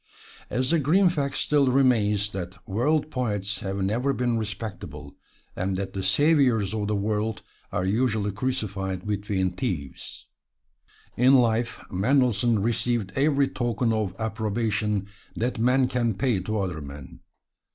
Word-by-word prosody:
And 130 Hz, -, 0 dB
the 165 Hz, +6 st, +2 dB
grim 175 Hz, +7 st, +4 dB
fact 140 Hz, -5 st, -2 dB
still 145 Hz, -2 st, +2 dB
remains 110 Hz, -6 st, +3 dB
that 90 Hz, -1 st, -7 dB
world 145 Hz, +9 st, +1 dB
poets 105 Hz, -5 st, -2 dB
have 95 Hz, 0 st, -3 dB
never 120 Hz, +8 st, +1 dB
been 120 Hz, -2 st, 0 dB
"respectable," 95 Hz, -9 st, -6 dB, 0.4 s
and 95 Hz, +1 st, -1 dB
that 95 Hz, 0 st, -4 dB
the 95 Hz, -, -3 dB
saviors 120 Hz, -, +3 dB
of 105 Hz, -2 st, -2 dB
the 105 Hz, -, 0 dB
world 105 Hz, +2 st, -1 dB, 0.3 s
are 90 Hz, -, -1 dB
usually 110 Hz, 0 st, +1 dB
crucified 100 Hz, -5 st, -3 dB
between 100 Hz, -3 st, -1 dB
thieves. 90 Hz, -, -5 dB, 0.9 s
In 130 Hz, +3 st, +5 dB
life 120 Hz, -2 st, +1 dB
Mendelssohn 115 Hz, 0 st, +2 dB
received 115 Hz, -2 st, 0 dB
every 140 Hz, 0 st, +3 dB
token 120 Hz, -2 st, 0 dB
of 105 Hz, -4 st, -1 dB
approbation 110 Hz, -1 st, -1 dB, 0.3 s
that 120 Hz, 0 st, -2 dB
men 125 Hz, +2 st, +3 dB
can 120 Hz, -4 st, 0 dB
pay 120 Hz, -2 st, +1 dB
to 110 Hz, +4 st, -3 dB
other 90 Hz, -6 st, -2 dB
men. 70 Hz, -1 st, -10 dB
110 Hz, 135 wpm, -26 LUFS, 100-125 Hz, 0.9 s, In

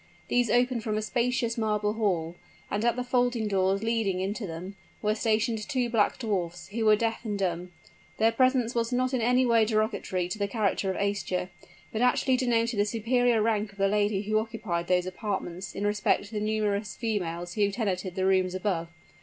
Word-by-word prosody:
These 245 Hz, -2 st, +2 dB
opened 245 Hz, +1 st, +2 dB
from 215 Hz, -1 st, -1 dB
a -, -, 0 dB
spacious 240 Hz, 0 st, 0 dB
marble 210 Hz, -1 st, 0 dB
hall; 180 Hz, -7 st, 0 dB, 0.4 s
and 205 Hz, +2 st, -1 dB
at 235 Hz, 0 st, +2 dB
the 250 Hz, -, -2 dB
folding 245 Hz, -3 st, +1 dB
doors 195 Hz, 0 st, +1 dB
leading 225 Hz, -5 st, 0 dB
into 200 Hz, +3 st, -3 dB
them, 175 Hz, +4 st, -7 dB, 0.2 s
were 210 Hz, 0 st, +1 dB
stationed 220 Hz, +1 st, +1 dB
two 250 Hz, -4 st, 0 dB
black 215 Hz, -3 st, +2 dB
dwarfs, 175 Hz, -6 st, -3 dB
who 225 Hz, +2 st, -2 dB
were 215 Hz, 0 st, +7 dB
deaf 225 Hz, +1 st, -2 dB
and 210 Hz, -3 st, -2 dB
dumb. 180 Hz, -2 st, -2 dB, 0.5 s
Their 225 Hz, +1 st, +4 dB
presence 255 Hz, 0 st, +2 dB
was 230 Hz, 0 st, 0 dB
not 255 Hz, +1 st, 0 dB
in 255 Hz, -, +1 dB
any 250 Hz, +2 st, +3 dB
way 230 Hz, -2 st, +4 dB
derogatory 215 Hz, -4 st, 0 dB
to 215 Hz, -, -4 dB
the 200 Hz, -, +1 dB
character 200 Hz, -2 st, 0 dB
of 190 Hz, -, -2 dB
Aischa, 200 Hz, -2 st, -1 dB, 0.4 s
but 220 Hz, -, -2 dB
actually 250 Hz, +1 st, +3 dB
denoted 235 Hz, -3 st, +1 dB
the 205 Hz, -, +4 dB
superior 230 Hz, +1 st, +2 dB
rank 215 Hz, -2 st, 0 dB
of -, -, -21 dB
the 195 Hz, 0 st, +3 dB
lady 205 Hz, 0 st, +1 dB
who 215 Hz, +1 st, +1 dB
occupied 215 Hz, -6 st, -3 dB
those 180 Hz, -1 st, +2 dB
apartments 185 Hz, -2 st, -4 dB
in 200 Hz, -, -2 dB
respect 210 Hz, 0 st, +1 dB
to 205 Hz, -, -12 dB
the 210 Hz, -, -1 dB
numerous 210 Hz, -1 st, -1 dB
females 175 Hz, -6 st, -3 dB
who 205 Hz, 0 st, +2 dB
tenanted 190 Hz, -4 st, -2 dB
the 185 Hz, -, 0 dB
rooms 185 Hz, -1 st, +2 dB
above. 185 Hz, -3 st, -1 dB
215 Hz, 195 wpm, -28 LUFS, 195-230 Hz, 0.5 s, were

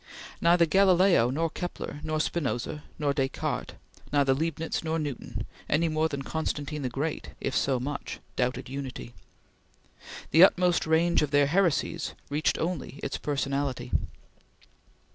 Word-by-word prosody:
Neither 170 Hz, 0 st, +5 dB
Galileo 185 Hz, -7 st, +5 dB
nor 160 Hz, +5 st, 0 dB
Kepler, 175 Hz, -4 st, -5 dB
neither 155 Hz, 0 st, 0 dB
Spinoza 150 Hz, -2 st, -2 dB
nor 145 Hz, -2 st, +1 dB
Descartes, 135 Hz, -2 st, -2 dB, 0.4 s
neither 140 Hz, -2 st, +4 dB
Leibnitz 160 Hz, +3 st, -2 dB
nor 160 Hz, 0 st, -1 dB
Newton, 145 Hz, -6 st, -4 dB, 0.2 s
any 165 Hz, +3 st, +2 dB
more 155 Hz, +1 st, +1 dB
than 140 Hz, -2 st, -4 dB
Constantine 150 Hz, -1 st, -3 dB
the 130 Hz, -, -1 dB
Great 145 Hz, +6 st, -3 dB
if 135 Hz, -, -2 dB
so 130 Hz, -1 st, +2 dB
much 145 Hz, +3 st, -5 dB, 0.2 s
doubted 125 Hz, 0 st, -1 dB
Unity. 130 Hz, -2 st, -6 dB, 1.2 s
The 165 Hz, +4 st, +8 dB
utmost 180 Hz, -3 st, +4 dB
range 165 Hz, +2 st, +3 dB
of 150 Hz, -, 0 dB
their 145 Hz, 0 st, +4 dB
heresies 165 Hz, 0 st, +1 dB, 0.2 s
reached 145 Hz, 0 st, +1 dB
only 160 Hz, -4 st, -3 dB
its -, -, -3 dB
personality. 140 Hz, -3 st, -2 dB
150 Hz, 130 wpm, -28 LUFS, 140-165 Hz, 1.2 s, The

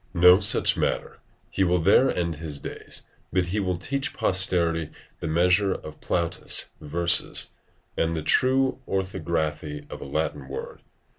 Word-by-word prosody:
No 90 Hz, +2 st, +7 dB
such -, -, +3 dB
matter; -, -, -2 dB, 0.3 s
he 95 Hz, -, +1 dB
will 90 Hz, -1 st, +2 dB
there 100 Hz, +10 st, +4 dB
end 85 Hz, -3 st, -2 dB
his 75 Hz, -2 st, -5 dB
days, -, -, -7 dB, 0.3 s
but 90 Hz, 0 st, +1 dB
he 95 Hz, +5 st, -2 dB
will 90 Hz, -3 st, -1 dB
teach 135 Hz, +8 st, -3 dB
posterity 85 Hz, -4 st, +2 dB, 0.3 s
the -, -, -4 dB
measure 90 Hz, +5 st, +2 dB
of 75 Hz, 0 st, -10 dB
Plautus' 85 Hz, -1 st, 0 dB
verses 85 Hz, +3 st, +2 dB, 0.4 s
and 80 Hz, 0 st, 0 dB
the 80 Hz, -, -4 dB
true 130 Hz, -, +2 dB
orthography 80 Hz, -6 st, -3 dB
of -, -, -8 dB
a -, -, -7 dB
Latin 75 Hz, -1 st, -3 dB
word. 70 Hz, -, -7 dB
85 Hz, 145 wpm, -25 LUFS, 80-95 Hz, 0.4 s, No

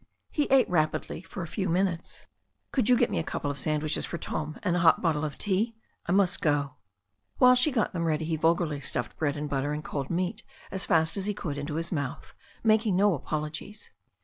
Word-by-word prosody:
He 295 Hz, -, +1 dB
ate 270 Hz, -2 st, +4 dB
rapidly 155 Hz, -2 st, 0 dB
for 190 Hz, 0 st, -7 dB
a -, -, -5 dB
few 190 Hz, +3 st, -2 dB
minutes. 180 Hz, -1 st, -1 dB, 0.5 s
"Could 255 Hz, -5 st, +1 dB
you 250 Hz, -, +6 dB
get 240 Hz, -1 st, +2 dB
me -, -, 0 dB
a -, -, -1 dB
couple 145 Hz, -, -3 dB
of 140 Hz, -, -7 dB
sandwiches 155 Hz, +2 st, 0 dB
for 170 Hz, -, -3 dB
Tom 155 Hz, -2 st, -4 dB
and 180 Hz, -3 st, +1 dB
a -, -, +2 dB
hot 165 Hz, -1 st, +5 dB
bottle 155 Hz, -3 st, +1 dB
of 150 Hz, -3 st, -3 dB
tea? 210 Hz, +4 st, 0 dB, 0.3 s
I -, -, 0 dB
must 190 Hz, -1 st, +3 dB
go." 145 Hz, -3 st, 0 dB, 0.6 s
While 250 Hz, -1 st, +7 dB
she 250 Hz, +4 st, +3 dB
got 230 Hz, -5 st, 0 dB
them 170 Hz, -2 st, -1 dB
ready 160 Hz, -1 st, 0 dB
he 160 Hz, 0 st, 0 dB
vulgarly 160 Hz, -2 st, +1 dB
stuffed 125 Hz, -4 st, -3 dB
bread 150 Hz, -1 st, 0 dB
and 150 Hz, +1 st, -3 dB
butter 145 Hz, +1 st, -1 dB
and 150 Hz, +1 st, -5 dB
cold 140 Hz, -3 st, -3 dB
meat 185 Hz, +6 st, -1 dB, 0.3 s
as 190 Hz, -, -2 dB
fast 165 Hz, +2 st, +2 dB
as 195 Hz, 0 st, -2 dB
he 210 Hz, -, -1 dB
could 145 Hz, -6 st, -4 dB
into 145 Hz, +1 st, -4 dB
his 165 Hz, +2 st, -2 dB
mouth, 145 Hz, -6 st, -4 dB, 0.3 s
making 215 Hz, -3 st, +3 dB
no 200 Hz, +1 st, +4 dB
apologies. 155 Hz, +7 st, -5 dB
165 Hz, 215 wpm, -28 LUFS, 150-195 Hz, 0.6 s, While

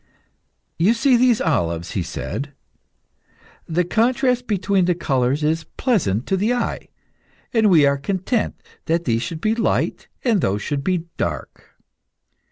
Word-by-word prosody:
"You 200 Hz, +8 st, +4 dB
see 260 Hz, +2 st, +3 dB
these 245 Hz, -1 st, +4 dB
olives," 85 Hz, -, 0 dB
he 95 Hz, -, -1 dB
said. 140 Hz, -, -5 dB, 1.1 s
"The 170 Hz, +2 st, +1 dB
contrast 245 Hz, +5 st, +1 dB
between 195 Hz, -2 st, +1 dB
the 180 Hz, -1 st, +2 dB
colours 135 Hz, -2 st, 0 dB
is 160 Hz, +2 st, 0 dB
pleasant 135 Hz, -, +1 dB
to 195 Hz, -, 0 dB
the 220 Hz, +6 st, +1 dB
eye, 245 Hz, -, -3 dB, 0.7 s
and 220 Hz, -3 st, +4 dB
we 160 Hz, -6 st, +6 dB
are 140 Hz, 0 st, +2 dB
content 190 Hz, -, -1 dB, 0.3 s
that 170 Hz, +1 st, 0 dB
these 115 Hz, -2 st, +1 dB
should 165 Hz, +3 st, -5 dB
be 215 Hz, +3 st, +2 dB
light 225 Hz, 0 st, -1 dB, 0.2 s
and 225 Hz, -7 st, +2 dB
those 100 Hz, +1 st, 0 dB
should 145 Hz, -2 st, -2 dB
be 180 Hz, 0 st, 0 dB
dark. -, -, -5 dB
175 Hz, 145 wpm, -21 LUFS, 140-225 Hz, 1.1 s, we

